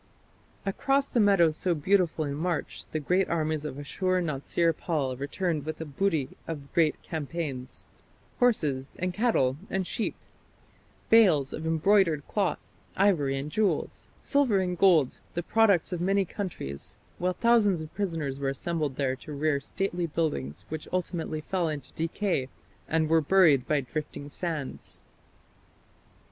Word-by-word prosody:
" -, -, -33 dB, 0.2 s
Across 275 Hz, +8 st, +1 dB
the 240 Hz, -, +1 dB
meadows 195 Hz, -7 st, +4 dB
so 175 Hz, +1 st, 0 dB
beautiful 170 Hz, 0 st, +2 dB
in 140 Hz, -, -3 dB
March 165 Hz, +2 st, -3 dB
the 155 Hz, -, -1 dB
great 180 Hz, +6 st, +1 dB
armies 155 Hz, -2 st, -1 dB
of 140 Hz, -3 st, -5 dB
Ashur 185 Hz, +6 st, -1 dB
natsir 165 Hz, +1 st, 0 dB
pal 145 Hz, -7 st, -1 dB
returned 150 Hz, +4 st, -2 dB
with 155 Hz, +2 st, -4 dB
the 160 Hz, -, -5 dB
booty 155 Hz, -1 st, 0 dB, 0.2 s
of 145 Hz, -4 st, -7 dB
great 160 Hz, -3 st, +3 dB
campaigns 145 Hz, -5 st, -5 dB, 0.5 s
horses 150 Hz, -, +1 dB
and 180 Hz, 0 st, -2 dB
cattle 175 Hz, -, +2 dB
and 190 Hz, -1 st, -1 dB
sheep, 225 Hz, +5 st, -2 dB, 1.0 s
bales 180 Hz, -12 st, +5 dB
of 160 Hz, +1 st, -4 dB
embroidered 165 Hz, -2 st, +3 dB
cloth, 200 Hz, -4 st, 0 dB, 0.4 s
ivory 155 Hz, -9 st, +3 dB
and 140 Hz, +3 st, -4 dB
jewels, 215 Hz, +2 st, -1 dB, 0.2 s
silver 280 Hz, -8 st, +3 dB
and 180 Hz, -2 st, -1 dB
gold, 165 Hz, -9 st, +4 dB, 0.2 s
the 175 Hz, -, -1 dB
products 200 Hz, -4 st, +3 dB
of 175 Hz, -, -3 dB
many 195 Hz, +2 st, +2 dB
countries; 165 Hz, -, -6 dB, 0.2 s
while 180 Hz, +1 st, +1 dB
thousands 205 Hz, -7 st, +3 dB
of 155 Hz, -, -11 dB
prisoners 165 Hz, -9 st, -2 dB
were 140 Hz, -1 st, 0 dB
assembled 150 Hz, 0 st, -2 dB
there 130 Hz, -1 st, 0 dB
to 150 Hz, -, -11 dB
rear 145 Hz, 0 st, +1 dB
stately 175 Hz, +3 st, -2 dB
buildings 100 Hz, -, -2 dB
which 155 Hz, -1 st, -5 dB
ultimately 170 Hz, -4 st, -2 dB
fell 175 Hz, +1 st, -1 dB
into 145 Hz, -4 st, -6 dB
decay 165 Hz, -4 st, -1 dB, 0.4 s
and 160 Hz, 0 st, +1 dB
were 160 Hz, +1 st, +4 dB
buried 150 Hz, -6 st, +4 dB
by 150 Hz, -2 st, +2 dB
drifting 145 Hz, +2 st, -6 dB
sands. 155 Hz, -3 st, -4 dB
165 Hz, 145 wpm, -28 LUFS, 145-190 Hz, 1.0 s, bales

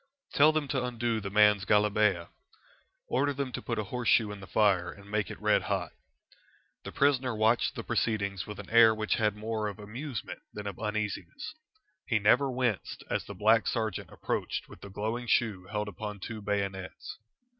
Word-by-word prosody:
"Tell 150 Hz, +2 st, +6 dB
them 155 Hz, -2 st, -1 dB
to 130 Hz, -3 st, 0 dB
undo 120 Hz, -2 st, -1 dB
the 100 Hz, -, -4 dB
man's 105 Hz, -1 st, +5 dB
galabeeah. 105 Hz, -4 st, +2 dB, 0.8 s
Order 145 Hz, +2 st, +1 dB
them 140 Hz, -2 st, -2 dB
to -, -, -4 dB
put 115 Hz, -, -3 dB
a 110 Hz, -, 0 dB
horseshoe 115 Hz, 0 st, +2 dB
in 105 Hz, -, -7 dB
the 100 Hz, -, -10 dB
fire 95 Hz, -5 st, +2 dB
and 100 Hz, +1 st, -14 dB
make 105 Hz, -4 st, 0 dB
it -, -, -8 dB
red -, -, +3 dB
hot." -, -, -2 dB, 0.9 s
The -, -, -7 dB
prisoner 130 Hz, -4 st, +2 dB
watched 110 Hz, +2 st, +2 dB
the -, -, -5 dB
proceedings 100 Hz, -3 st, -1 dB
with 105 Hz, -, -7 dB
an -, -, -9 dB
air 115 Hz, -1 st, +7 dB
which 110 Hz, 0 st, 0 dB
had 105 Hz, -1 st, +2 dB
more 110 Hz, 0 st, -2 dB
of 100 Hz, -, -5 dB
amusement 115 Hz, +4 st, -6 dB
than 105 Hz, -, -6 dB
of 100 Hz, -3 st, -5 dB
uneasiness. 110 Hz, -, -3 dB, 0.5 s
He 115 Hz, -, +2 dB
never 125 Hz, +7 st, +4 dB
winced 125 Hz, -5 st, -2 dB
as -, -, -1 dB
the -, -, -8 dB
black 110 Hz, +1 st, +4 dB
sergeant 110 Hz, -2 st, -2 dB
approached -, -, -3 dB
with -, -, -14 dB
the 100 Hz, -, -9 dB
glowing 110 Hz, +5 st, -3 dB
shoe 105 Hz, -6 st, +1 dB
held 105 Hz, 0 st, -2 dB
upon 105 Hz, 0 st, -6 dB
two 110 Hz, +3 st, -6 dB
bayonets. 100 Hz, -2 st, -4 dB
110 Hz, 180 wpm, -30 LUFS, 105-120 Hz, 0.9 s, air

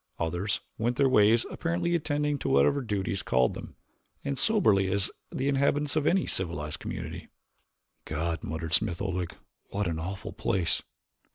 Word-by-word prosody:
Others 90 Hz, +5 st, -1 dB, 0.2 s
went 120 Hz, +2 st, +1 dB
their 140 Hz, +1 st, +4 dB
ways 115 Hz, -1 st, +5 dB
apparently 170 Hz, 0 st, -1 dB
attending 150 Hz, -3 st, 0 dB
to -, -, -2 dB
whatever 70 Hz, -, +4 dB
duties 100 Hz, -4 st, -1 dB
called 65 Hz, 0 st, +2 dB
them, -, -, -9 dB, 0.5 s
as 140 Hz, -2 st, -1 dB
soberly 105 Hz, -, +3 dB
as 100 Hz, +1 st, +1 dB, 0.2 s
the 130 Hz, -, -1 dB
inhabitants 140 Hz, +1 st, +2 dB
of 155 Hz, -1 st, +2 dB
any 190 Hz, +1 st, +3 dB
civilized 80 Hz, -5 st, -2 dB
community. -, -, -6 dB, 0.8 s
"God," 80 Hz, +1 st, -2 dB
muttered 80 Hz, 0 st, -4 dB
Smith 95 Hz, -6 st, +1 dB
Oldwick, 90 Hz, 0 st, -2 dB, 0.3 s
"what 105 Hz, +1 st, -1 dB
an 80 Hz, -2 st, -2 dB
awful 95 Hz, +4 st, -5 dB
place!" 90 Hz, -4 st, 0 dB
105 Hz, 150 wpm, -29 LUFS, 85-140 Hz, 0.8 s, ways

